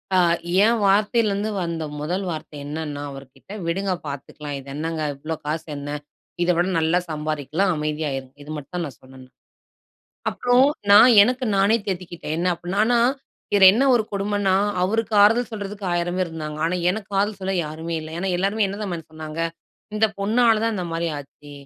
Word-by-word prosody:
ஆ -, -, +5 dB, 0.5 s
என் 230 Hz, +1 st, +3 dB
வார்த்தைல 210 Hz, +3 st, +3 dB
இருந்து 205 Hz, +2 st, -1 dB
வந்த 170 Hz, -2 st, -3 dB, 0.2 s
முதல் 180 Hz, +6 st, -2 dB
வார்த்த 155 Hz, -1 st, -7 dB
என்னென்ன 145 Hz, -1 st, -5 dB
அவர்கிட்ட, 135 Hz, +6 st, -13 dB, 0.2 s
விடுங்க 190 Hz, +3 st, 0 dB
பாத்துக்கலாம். 145 Hz, +1 st, -6 dB
இது 135 Hz, -, -14 dB
என்னங்க? 160 Hz, +1 st, -3 dB, 0.2 s
இவ்ளோ 155 Hz, +3 st, -4 dB
காசு 155 Hz, +2 st, -2 dB
என்ன? 145 Hz, +1 st, -5 dB, 0.5 s
இத 175 Hz, -, 0 dB
விட 175 Hz, +1 st, +2 dB
நல்லா 160 Hz, +2 st, +2 dB
சம்பாரிக்கலாம் 155 Hz, +4 st, -1 dB
அமைதியாயிருங்க. 150 Hz, -3 st, -3 dB
இது 150 Hz, -, -9 dB
மட்டும் 170 Hz, +5 st, -5 dB
நான் 135 Hz, -7 st, -9 dB
சொன்னேன் 130 Hz, 0 st, -14 dB
நான். 130 Hz, -, -26 dB, 1.0 s
அப்றோம் 250 Hz, +3 st, +3 dB, 0.2 s
நான் 220 Hz, +5 st, +9 dB
எனக்கு 250 Hz, +4 st, +1 dB
நானே 200 Hz, +3 st, +4 dB
தேத்திக்கிட்டேன், 175 Hz, -4 st, -4 dB
என்ன 175 Hz, -, 0 dB
அப்புட்ன்னா 175 Hz, +3 st, -4 dB
ஆனா 240 Hz, 0 st, +3 dB, 0.6 s
இது 195 Hz, -, +6 dB
என்ன 240 Hz, +7 st, +2 dB
ஒரு 235 Hz, -, +3 dB
கொடுமன்னா, 200 Hz, -1 st, 0 dB, 0.3 s
அவருக்கு 220 Hz, +4 st, 0 dB
ஆறுதல் 230 Hz, +4 st, +4 dB
சொல்றதுக்கு 205 Hz, -1 st, -6 dB
1,000 175 Hz, +1 st, -1 dB
பேரு 185 Hz, -2 st, 0 dB
இருந்தாங்க, 155 Hz, -1 st, -6 dB
ஆனா 180 Hz, -, 0 dB
எனக்கு 205 Hz, 0 st, -5 dB
ஆறுதல் 205 Hz, 0 st, 0 dB
சொல்ல 190 Hz, +1 st, -2 dB
யாருமே 160 Hz, +2 st, -5 dB
இல்ல. 155 Hz, -, -8 dB
ஏன்னா 190 Hz, +2 st, -2 dB
எல்லாருமே 200 Hz, +3 st, +1 dB
என்னதம்மான்னு 190 Hz, -5 st, -5 dB
சொன்னாங்க, 155 Hz, 0 st, -8 dB, 0.6 s
இந்த 220 Hz, +1 st, +4 dB
பொண்ணால 225 Hz, +2 st, +3 dB
தான் 230 Hz, -, +1 dB
இந்தமாரி 170 Hz, -2 st, -2 dB
ஆச்சு, 145 Hz, +1 st, -13 dB
175 Hz, 165 wpm, -23 LUFS, 155-205 Hz, 1.0 s, நான்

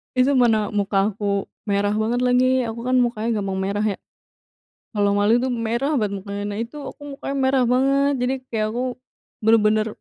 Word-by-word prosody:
Itu 260 Hz, +2 st, +3 dB
mana 225 Hz, -4 st, +3 dB
muka 200 Hz, 0 st, +1 dB
aku 200 Hz, -1 st, -2 dB, 0.2 s
merah 205 Hz, 0 st, 0 dB
banget 220 Hz, +3 st, 0 dB
lagi. 250 Hz, 0 st, +3 dB, 0.2 s
Aku 230 Hz, +1 st, -6 dB
kan 255 Hz, +1 st, +2 dB
mukanya 235 Hz, -2 st, 0 dB
gampang 195 Hz, -1 st, -3 dB
merah 200 Hz, +2 st, -1 dB
ya, -, -, -32 dB, 0.9 s
kalau 205 Hz, -2 st, +1 dB
malu 205 Hz, +4 st, +3 dB
tuh, 255 Hz, +1 st, -1 dB
merah 250 Hz, +7 st, 0 dB
banget. 200 Hz, -6 st, -2 dB
Nah, 200 Hz, -, -5 dB
karena 205 Hz, 0 st, -4 dB
itu, 230 Hz, +6 st, -5 dB
aku -, -, -18 dB
mukanya 275 Hz, 0 st, -5 dB
merah 265 Hz, 0 st, +3 dB
banget. 275 Hz, +2 st, +3 dB
Jadi 250 Hz, +2 st, +1 dB, 0.2 s
kayak 215 Hz, -2 st, 0 dB
aku 245 Hz, -, -1 dB, 0.6 s
bener-bener 215 Hz, -1 st, +4 dB
225 Hz, 175 wpm, -22 LUFS, 205-250 Hz, 0.9 s, bener-bener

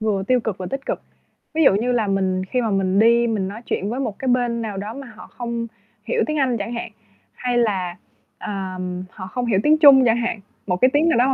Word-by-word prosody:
vừa 210 Hz, -3 st, 0 dB
tiêu 255 Hz, +2 st, +3 dB
cực 220 Hz, -4 st, -4 dB
và 185 Hz, -, -5 dB
tích 270 Hz, 0 st, -5 dB
cực. -, -, -3 dB, 0.5 s
Ví 320 Hz, -1 st, +3 dB
dụ 195 Hz, -, +6 dB
như 240 Hz, +5 st, +1 dB
là 225 Hz, -4 st, +1 dB
mình 190 Hz, -1 st, 0 dB
khi 250 Hz, +6 st, -1 dB
mà 225 Hz, -3 st, -1 dB
mình 195 Hz, 0 st, +1 dB
đi 235 Hz, +2 st, +5 dB
mình 205 Hz, -5 st, -1 dB
nói 210 Hz, +3 st, -7 dB
chuyện 200 Hz, -, -2 dB
với 250 Hz, +3 st, -3 dB
một 220 Hz, -7 st, -3 dB
cái 265 Hz, -, -3 dB
bên 240 Hz, -2 st, +1 dB
nào 210 Hz, -3 st, -4 dB
đó 205 Hz, +3 st, -5 dB
mà 270 Hz, -4 st, -9 dB
họ -, -, -11 dB
không 235 Hz, -1 st, -4 dB, 0.4 s
hiểu 470 Hz, -, 0 dB
tiếng 305 Hz, 0 st, -1 dB
Anh 255 Hz, -4 st, +2 dB
chẳng 205 Hz, +3 st, -4 dB
hạn, 235 Hz, -1 st, -5 dB, 0.4 s
hay 245 Hz, -1 st, -1 dB
là, 190 Hz, -6 st, 0 dB, 0.4 s
ờm, 185 Hz, -3 st, -5 dB
họ 185 Hz, -, -9 dB
không 245 Hz, +6 st, -3 dB
hiểu 200 Hz, -4 st, +2 dB
tiếng 310 Hz, +1 st, +4 dB
Trung 275 Hz, -4 st, +8 dB
chẳng 230 Hz, -1 st, +3 dB
hạn, 235 Hz, -2 st, -2 dB, 0.3 s
một 180 Hz, -, 0 dB
cái 255 Hz, -, +5 dB
tiếng 300 Hz, +3 st, +3 dB
nào 290 Hz, -, +3 dB
đó 250 Hz, +2 st, +4 dB
230 Hz, 250 wpm, -21 LUFS, 195-250 Hz, 0.5 s, Trung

